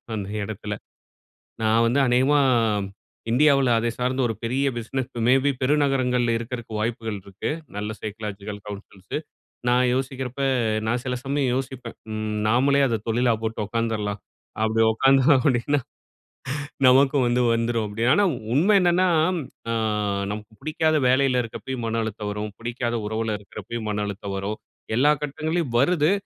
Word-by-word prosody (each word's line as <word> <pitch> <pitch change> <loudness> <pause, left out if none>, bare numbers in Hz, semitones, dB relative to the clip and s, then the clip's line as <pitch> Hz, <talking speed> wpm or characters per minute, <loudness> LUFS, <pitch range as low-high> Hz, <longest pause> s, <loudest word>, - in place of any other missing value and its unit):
அந்த 100 -2 -4 0.2
இடத்தில. 105 0 -5 0.9
நான் 110 +1 +3
வந்து 125 +5 +2
அநேகமா 130 +4 +3 0.9
இந்தியாவில 135 -1 +4
அதை 120 +1 0
சார்ந்த 130 +1 0
ஒரு 115 - -2
பெரிய 130 +4 0
பிசினஸ் 125 +3 -4 0.2
மே 130 - +7
பி 140 - +3
பெருநகரங்கள்ல 130 -4 +2
இருக்கறதுக்கு 115 -2 -5
வாய்ப்புகள் 110 -1 -2
இருக்கு. 100 0 -4 0.3
நல்ல 105 +1 -3
சைக்காலஜிக்கல் 105 -1 -6
கவுன்சில்ஸு 100 +2 -7 0.5
நான் 125 +1 +4
யோசிக்கிறப்ப 130 0 -3 0.4
நான் 120 +2 0
சில 125 - -1
சமயம் 135 -2 0
யோசிப்பேன். 130 -3 -5 0.2
ம் 110 0 -2
நாமளே 135 +5 +3
அத 115 -3 0
தொழிலா 120 +1 +2
போட்டு 110 0 -3
உட்கார்ந்துறலாம். 105 -2 -2 0.4
அப்படி 110 +1 +2
உட்கார்ந்தோம் 135 +5 +5
அப்படீன்னா 135 +1 +2 1.1
நமக்கும் 135 +1 +5
வந்து 120 +1 +2
வந்துரும் 115 -1 0
அப்படி. 105 +3 -4
ஆனா 205 - +4 0.3
உண்மை 180 +10 +4
என்னன்னா, 180 0 +3 0.6
ஆ - - 0 0.6
நமக்கு 105 +1 -7
புடிக்காத 155 0 +1
வேலையில 130 0 +3
இருக்கப்பயும் 120 +1 -6
மன 115 0 -1
அழுத்தம் 105 -1 -4
வரும், 105 +1 -4
புடிக்காத 120 0 -3
உறவில 110 0 -1
இருக்கிறப்பயும் 110 +2 -7
மன 105 0 -1
அழுத்தம் 100 0 -5
வரும். 100 +2 -3 0.4
எல்லா 145 +3 +5
கட்டங்கள்லயும் 155 -2 -2
வருது. 155 +4 +3
120 Hz, 135 wpm, -24 LUFS, 110-135 Hz, 1.1 s, மே